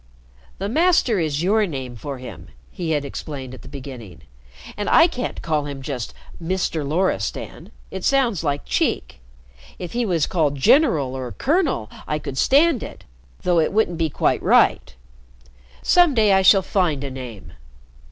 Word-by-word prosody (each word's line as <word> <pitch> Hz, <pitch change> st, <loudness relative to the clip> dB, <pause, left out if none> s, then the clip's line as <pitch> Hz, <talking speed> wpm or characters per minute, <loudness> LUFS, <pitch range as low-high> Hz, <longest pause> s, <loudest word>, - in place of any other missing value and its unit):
"'The 195 Hz, -, -3 dB
Master' 305 Hz, -, +2 dB
is 155 Hz, -1 st, -1 dB
your 210 Hz, +3 st, +2 dB
name 130 Hz, -6 st, -6 dB
for 140 Hz, +4 st, -6 dB
him," 105 Hz, -10 st, -10 dB, 0.2 s
he 170 Hz, -2 st, -5 dB
had 150 Hz, -2 st, 0 dB
explained 135 Hz, -2 st, -7 dB
at 130 Hz, -, -11 dB
the -, -, -13 dB
beginning. 125 Hz, -, -10 dB, 0.5 s
"And 205 Hz, -1 st, -3 dB
I 330 Hz, -, +7 dB
can't 255 Hz, -7 st, -4 dB
call 150 Hz, -3 st, -1 dB
him 140 Hz, -2 st, -7 dB
just 130 Hz, -5 st, -4 dB, 0.3 s
'Mister' 170 Hz, -2 st, -2 dB
Loristan. 150 Hz, -, -2 dB, 0.2 s
It 190 Hz, -, -6 dB
sounds 245 Hz, -, +1 dB
like 145 Hz, -2 st, -2 dB
cheek. -, -, -1 dB, 0.6 s
If 175 Hz, -2 st, -7 dB
he 240 Hz, +1 st, 0 dB
was 170 Hz, -5 st, +1 dB
called 155 Hz, -5 st, 0 dB
'General' 140 Hz, -, +3 dB
or 130 Hz, -2 st, -5 dB
'Colonel' 290 Hz, -, 0 dB, 0.2 s
I 150 Hz, -, -1 dB
could 140 Hz, -3 st, -5 dB
stand 290 Hz, -1 st, +4 dB
it -, -, -9 dB, 0.4 s
though 175 Hz, -2 st, +3 dB
it 155 Hz, -, +1 dB
wouldn't 190 Hz, -5 st, 0 dB
be 160 Hz, -1 st, +1 dB
quite -, -, 0 dB
right. -, -, +3 dB, 0.9 s
Some 350 Hz, -6 st, +4 dB
day 215 Hz, -3 st, +4 dB
I 190 Hz, -, +4 dB
shall 190 Hz, 0 st, +6 dB
find 175 Hz, -8 st, 0 dB
a 140 Hz, -, -5 dB
name. 125 Hz, -6 st, -9 dB
160 Hz, 160 wpm, -22 LUFS, 135-205 Hz, 0.9 s, I